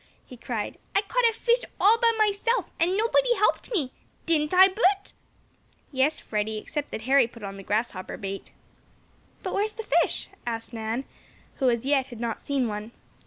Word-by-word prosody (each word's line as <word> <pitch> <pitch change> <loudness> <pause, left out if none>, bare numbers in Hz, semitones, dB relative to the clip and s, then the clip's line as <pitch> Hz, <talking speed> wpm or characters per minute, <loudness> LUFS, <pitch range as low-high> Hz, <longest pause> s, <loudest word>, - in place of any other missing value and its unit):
he 255 - -11
cried. 230 -3 -4 0.2
"I 400 - +4
caught 470 +3 +3
a - - -4
fish 475 +2 +2 0.2
all 440 +4 +5
by 465 -1 +5
myself, 430 +1 +1
and 355 +3 +2
nobody 480 +2 +3
helped 425 +4 +1
me. 300 - 0 0.3
Didn't 305 -3 +1
I, 375 +1 +8
Bert?" 390 0 +1 0.8
"Yes, 275 +3 +1
Freddie, 215 0 -2
except 290 +7 -4
that 220 - -6
Harry 265 0 +4
put 230 -2 -14
on 195 -1 -5
the 195 - -8
grasshopper 205 -2 -2
bait." 195 0 -6 0.9
"But - - -3
where's 425 +1 0
the 445 - -6
fish?" - - +1
asked 230 0 -4
Nan, 225 +3 -3 0.5
who, 265 -3 +3
as 235 0 0
yet, 270 -2 +2
had 240 -4 -10
not 230 -1 -3
seen 275 -4 0
one. 210 +2 -5
275 Hz, 175 wpm, -26 LUFS, -, 0.9 s, I